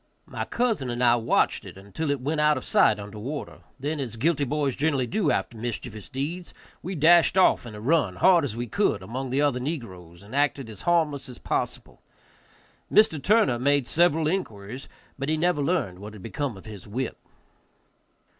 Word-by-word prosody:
My - - -5
cousin 225 - -1
and 120 +1 -2
I 120 -1 +6
watched 115 -1 +1
it - - -11
until 100 +11 -5
it 145 -1 0
went 150 +4 -1
out 150 -1 +4
of 130 - -6
sight 105 - +4
under 105 +1 -8
water; 140 +7 -6 0.2
then, 145 +3 -2
as 120 -5 -4
guilty 145 +4 +1
boys 140 -1 -1
generally 140 -3 +1
do 185 - 0
after 115 - -1
mischievous 115 -2 -5
deeds, 155 +7 -5 0.3
we 185 +2 -5
dashed 170 +4 +5
off 185 -9 +4
in 110 - -9
a - - -8
run, 120 - +1
hard 180 - +5
as 130 -7 -3
we 120 +1 -3
could, 120 - 0
among 130 +6 -5
the 135 +3 +1
other 140 -4 +1
negroes, 95 - -6
and 105 +6 -10
acted 140 -4 0
as 105 - -10
harmless 150 -5 +1
as 125 - -9
possible. - - -3 0.9
Mr. 165 -9 +4
Turner 195 - +3
made 140 +1 +2
several 160 +1 +2
inquiries, 130 - -4 0.3
but 135 +2 -2
never 155 0 +1
learned 140 - -1
what 105 +1 -9
had 105 - -12
become 130 -1 -3
of 95 - -13
his 105 -3 -10
whip. 120 +4 -4
135 Hz, 185 wpm, -26 LUFS, 115-155 Hz, 0.9 s, I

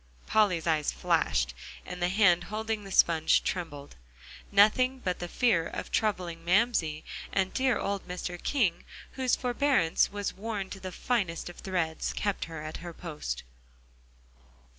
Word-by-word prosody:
Polly's 200 -7 +2
eyes 155 -3 +1
flashed, 65 0 +1 0.3
and 180 0 -7
the 175 - +2
hand 180 -3 +4
holding 215 +1 -3
the 195 - -9
sponge 160 -3 +4
trembled. 145 -6 -4 0.6
Nothing 255 +6 +5
but 180 -8 -2
the 175 - -4
fear 175 -5 +2
of - - -6
troubling 180 -6 -1
Mamsie, 175 -5 +2 0.3
and 190 -1 0
dear 260 -2 +2
old 200 -2 -3
Mr. 180 -1 -5
King 205 -12 +1 0.3
whose 260 -2 +1
forbearance 250 - +2
was 205 0 -3
worn 200 -2 -4
to 195 - -6
the 185 -1 -6
finest 185 -6 -1
of 175 - -11
threads, 175 -4 -2
kept 205 -2 -1
her 160 -2 -7
at 155 0 -5
her 170 -1 -8
post. 150 - -5
185 Hz, 145 wpm, -29 LUFS, 165-215 Hz, 0.6 s, Nothing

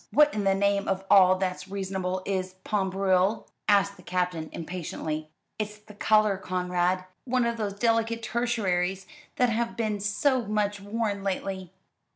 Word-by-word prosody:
"What 300 0 +5
in 210 -2 -1
the 195 0 +4
name 200 0 +1
of 190 0 -1
all 185 -2 +7
that's 185 -1 -3
reasonable 190 -1 -3
is 185 -1 -2
pain 195 -3 0
brûlé?" 190 +2 +2 0.2
asked 200 -1 +4
the - - -14
Captain 180 -3 -2
impatiently. 155 -2 -4 0.3
"It's 210 0 -3
the 210 0 -15
colour, 215 -1 +3
Conrad. 180 0 0 0.2
One 250 -1 +1
of 235 0 -1
those 210 -3 -2
delicate 230 +1 +1
tertiaries 195 -6 0 0.3
that 250 -1 +3
have 230 +1 -1
been 215 -3 -1
so 250 +6 +1
much 205 -1 0
worn 205 0 -2
lately." 190 -2 -3
200 Hz, 155 wpm, -27 LUFS, 185-215 Hz, 0.3 s, all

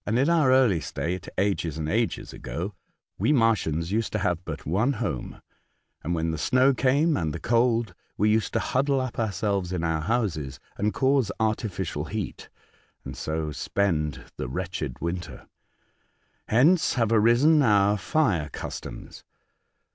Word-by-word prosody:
In 125 +9 +2
our 155 -6 +4
early 125 -9 +4
state, 85 +5 -4
ages 90 -5 0
and 80 -1 -3
ages 110 +7 -1
ago, 95 +5 -5 0.5
we - - +2
Mar 115 -5 +5
tians 85 -3 -3
used 110 +2 0
to - - +1
have 90 -3 -1
but - - -6
one 105 - +1
home, 105 - -4 0.6
and 85 +3 -2
when 80 0 -1
the 80 - -4
snow 130 - +3
came 140 +5 +2
and 80 -3 -1
the 85 - -5
cold, 115 0 +1 0.2
we 105 +2 +3
used 110 0 +1
to - - +2
huddle 135 +1 +1
up 130 -2 -4
ourselves 100 -3 -1
in 90 -2 -2
our 80 -1 0
houses 80 - -1 0.2
and 105 +1 0
cause 135 -5 +2
artificial 100 -8 -2
heat, 105 +3 -5 0.6
and - - -6
so 80 -1 -3
spend 75 -3 -1
the 65 - -4
wretched 80 -4 -4
winter. 85 -4 -5 1.0
Hence 155 +10 +4
have 115 -3 +1
arisen 120 +8 +5
our 105 -4 +4
fire 100 - 0
customs. - - -8
105 Hz, 150 wpm, -26 LUFS, 85-120 Hz, 1.0 s, Mar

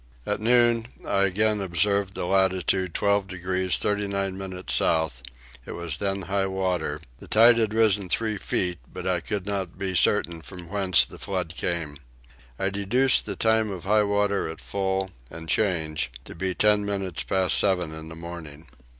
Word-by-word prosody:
At 105 0 -2
noon 120 0 +3 0.2
I 100 0 +3
again 105 +2 +1
observed 100 +2 +1
the - - -2
latitude 95 -1 +1
12 100 -1 +1
degrees 90 0 0
39 100 -2 -1
minutes 95 -1 -5
south; 80 -6 +1 0.4
it - - -8
was 85 -4 -4
then 100 +1 -2
high 95 +2 0
water, 90 -6 -2 0.2
the - - -11
tide 115 +2 +6
had 110 -2 +1
risen 105 -4 +3
three 110 +1 0
feet, 90 -3 -1
but - - -7
I 90 -1 +1
could 100 +2 -4
not 95 -4 -3
be 95 -1 -2
certain 85 -1 +2
from 90 -1 -10
whence 95 -3 +3
the - - -13
flood 90 -4 -3
came. 80 -5 -2 0.6
I 95 - -1
deduce 120 +7 +3
the - - -5
time 110 -1 +2
of 95 -4 -6
high 105 +3 +3
water 100 -2 0
at 80 - -7
full 95 -1 -2 0.2
and 80 0 -8
change 80 - 0
to - - -9
be 95 +2 -2
ten 105 -1 +3
minutes 95 -4 -2
past 95 -1 +2
seven 90 -5 +1
in 80 0 -8
the 80 - -9
morning. 80 -2 -9
95 Hz, 170 wpm, -25 LUFS, 85-100 Hz, 0.6 s, tide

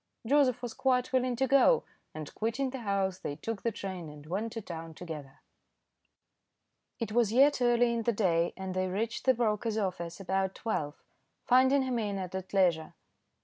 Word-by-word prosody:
Joseph 255 -1 +3
was 240 -2 -4
quite 255 -1 +1
willing 255 -1 +2
to 265 +3 +1
go, 275 - +5 0.3
and 155 -2 -7
quitting 245 +5 -1
the 265 - -5
house, 195 -4 -1
they 145 - -4
took 215 +7 -5
the 230 - 0
train 185 -5 -6
and 150 0 -12
went 200 +8 -3
to 230 - -4
town 165 -5 -8
together. 150 -5 -8 1.6
It 230 -3 -3
was 230 -2 +2
yet 275 +3 +4
early 240 -1 +3
in 230 - -1
the 235 - +1
day, 175 -6 +1
and 190 -1 -4
they 185 0 0
reached 215 +5 -3
the 260 -1 +5
broker's 225 -1 0
office 175 -4 -3
about 190 0 -1
twelve, 150 -10 -3 0.4
finding 260 +2 +5
him 255 -2 -1
in 205 -3 -2
and 185 -1 -5
at 190 0 -5
leisure. 175 -5 +2
210 Hz, 180 wpm, -30 LUFS, 185-245 Hz, 1.6 s, go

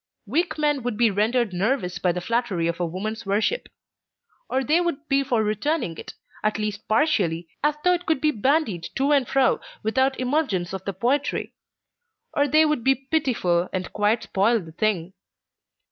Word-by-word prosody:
Weak 320 - 0
men 295 -2 +1
would 240 -3 -3
be 235 -2 +4
rendered 220 +1 +1
nervous 185 0 -1
by 180 - +2
the 180 +1 -3
flattery 230 -5 -1
of 170 +1 -1
a 175 - +1
woman's 210 +6 -4
worship; 210 - 0 0.8
or 265 +1 0
they 310 +6 +3
would 325 -3 -3
be 275 -1 +3
for 240 -5 +1
returning 215 - -1
it, - - -9 0.3
at 215 0 +1
least 210 -1 -4
partially, 195 - +1 0.2
as 295 0 +2
though 360 - +5
it 355 0 -3
could 320 -3 +2
be 305 +1 +2
bandied 225 - 0
to 275 +2 +1
and 275 -4 +3
fro 270 -1 +2 0.2
without 260 +5 +1
emulgence 250 - 0
of 190 -1 -6
the 195 - -2
poetry; 270 - -1 0.8
or 285 0 +2
they 310 +3 +5
would 300 -6 0
be 270 +2 +4 0.2
pitiful, 185 - +1
and 185 -1 -4
quite 210 +2 +1
spoil 220 +4 +2
the 165 -5 -10
thing. 185 -1 -1
230 Hz, 175 wpm, -24 LUFS, 195-285 Hz, 0.8 s, though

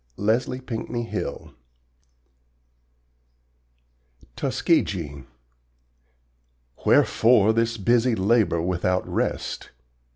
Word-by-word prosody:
Leslie 115 +5 0
Pinckney 120 -1 -4
Hill 115 - -5 2.8
TUSKEGEE 75 -8 -1 1.6
Wherefore 110 -2 +4
this 115 0 0
busy 120 +3 +2
labor 100 -4 +2
without 90 +1 -1
rest? - - -3
110 Hz, 60 wpm, -24 LUFS, 90-120 Hz, 2.8 s, Wherefore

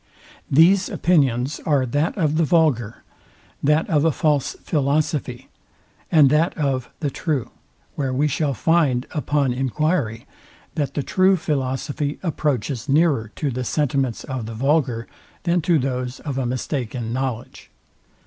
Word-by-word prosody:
These 180 +7 +5
opinions 135 -5 +1
are 140 -4 +2
that 145 - -1
of 155 -4 +1
the 165 - +3
vulgar, 150 -9 +1 0.6
that 150 +3 +2
of 150 -3 +2
a 165 - +4
false 150 -2 0
philosophy, 145 -3 -1 0.6
and 150 -5 +6
that 160 +3 +2
of 135 -5 -1
the 145 -3 -1
true; 145 -4 -2 0.4
where 135 -2 -2
we 140 +4 +1
shall 145 -1 -1
find 140 -2 +2
upon 145 -4 0
enquiry, 135 -2 -1 0.5
that 145 -3 -2
the 145 - -1
true 190 +5 +3
philosophy 145 -1 -2
approaches 140 - -2
nearer 140 -7 +2
to 145 -3 -2
the 130 +1 -3
sentiments 135 -3 -1
of 130 -5 -5
the 115 - -6
vulgar, 130 -2 +1 0.4
than 175 0 +1
to 170 0 +3
those 125 -2 -2
of 140 -3 -3
a 130 - -1
mistaken 125 -2 -3
knowledge. 130 -2 -4
140 Hz, 140 wpm, -22 LUFS, 130-155 Hz, 0.6 s, and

